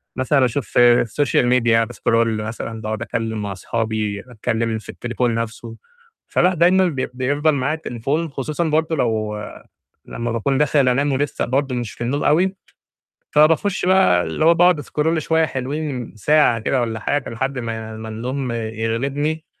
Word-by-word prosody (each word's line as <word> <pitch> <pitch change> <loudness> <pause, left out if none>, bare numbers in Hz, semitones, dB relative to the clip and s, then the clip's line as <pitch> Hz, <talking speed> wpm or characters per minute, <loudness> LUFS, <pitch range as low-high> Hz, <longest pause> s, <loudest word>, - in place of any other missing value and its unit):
مثلًا 130 +1 +2
أشوف 120 -1 -3
الsocial 120 +3 +3
media 120 -2 +3
باسكرول 115 -2 0
مثلًا 110 0 -6
باقعُد 110 0 -4
أتكلّم 110 -1 -3
مع 100 -1 -4
أصحابي، 110 +1 -2
أتكلّم 115 0 -1
في - - -16
التليفون 120 -1 -2
نَفْسه، 115 0 -5 0.5
فلأ 180 +1 +2
دايمًا 180 +3 +4
بي 135 -6 -2
بيفضل 145 +5 +1
معايا 140 +3 0
التليفون 150 +2 -3
خصوصًا 150 +4 -3
برضه 160 +1 +1
لو 110 -5 -1 0.7
لمّا 120 0 -4
باكون 130 +4 0
داخل 145 -2 +3
أنام 140 +3 +1
ولسّه 140 +2 -1
برضه 135 +1 -1
مش 120 -3 -3
في - - -15
النوم 135 +5 -1
أوي 180 +6 +2 0.8
فباخُش 165 +6 +3
بقى 185 - +4
اللي 80 - -1
هو 170 - +7
باقعُد 175 -1 +4
أسكرول 155 +2 -1
شوية 160 +1 +2
حلوين 135 -3 -4
ساعة 135 0 +3
كده 125 +3 0
والّا 110 -2 -2
حاجة 145 +5 -1
لحد 130 +3 -3
ما 110 -1 -5
ما 110 0 -7
النوم 125 +3 -3
يغلبني، 115 +8 -2
125 Hz, 155 wpm, -20 LUFS, 115-150 Hz, 0.8 s, هو